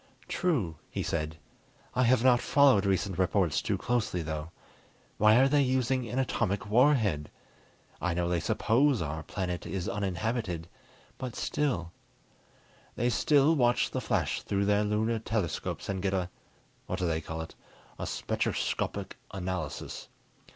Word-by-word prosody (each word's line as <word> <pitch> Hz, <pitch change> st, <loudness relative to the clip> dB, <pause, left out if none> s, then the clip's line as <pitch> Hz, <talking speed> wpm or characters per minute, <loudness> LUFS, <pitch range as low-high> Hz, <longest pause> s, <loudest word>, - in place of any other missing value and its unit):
"True," 120 Hz, -, 0 dB
he -, -, -3 dB
said. 80 Hz, 0 st, -2 dB, 0.6 s
"I 125 Hz, -, +1 dB
have 120 Hz, 0 st, +4 dB
not 125 Hz, -2 st, +5 dB
followed 135 Hz, -9 st, +4 dB
recent 95 Hz, -1 st, 0 dB
reports 95 Hz, -4 st, +2 dB
too -, -, -1 dB
closely, 110 Hz, -8 st, -1 dB
though. 80 Hz, 0 st, -4 dB, 0.7 s
Why 105 Hz, +1 st, +6 dB
are 130 Hz, +3 st, +6 dB
they 145 Hz, +1 st, +3 dB
using 130 Hz, -2 st, +1 dB
an 125 Hz, -, -3 dB
atomic 105 Hz, -7 st, 0 dB
warhead? 110 Hz, -, +3 dB, 0.7 s
I 85 Hz, -1 st, 0 dB
know 90 Hz, 0 st, 0 dB
they 85 Hz, 0 st, +1 dB
suppose 130 Hz, -, +2 dB
our 80 Hz, +1 st, -4 dB
planet 90 Hz, +1 st, -4 dB
is 90 Hz, 0 st, -3 dB
uninhabited, 100 Hz, -3 st, -2 dB, 0.5 s
but 125 Hz, -3 st, -5 dB
still 95 Hz, -, -1 dB, 0.6 s
" -, -, -31 dB
"They 120 Hz, +1 st, +1 dB, 0.2 s
will 150 Hz, +2 st, +6 dB
watch 120 Hz, -4 st, +2 dB
the -, -, -2 dB
flash -, -, 0 dB
through 100 Hz, 0 st, 0 dB
their 105 Hz, +1 st, +3 dB
lunar 110 Hz, +2 st, 0 dB
telescopes 105 Hz, -8 st, -2 dB
and 95 Hz, -2 st, -2 dB
get 95 Hz, 0 st, 0 dB
a 90 Hz, -1 st, -2 dB, 0.6 s
what 90 Hz, -, -2 dB
do 90 Hz, -, -1 dB
they 80 Hz, -1 st, 0 dB
call 80 Hz, +1 st, -5 dB
it? 80 Hz, -, -8 dB, 0.5 s
a -, -, -3 dB
spectroscopic -, -, -2 dB
analysis. 90 Hz, -5 st, -5 dB
100 Hz, 145 wpm, -29 LUFS, 90-125 Hz, 0.7 s, Why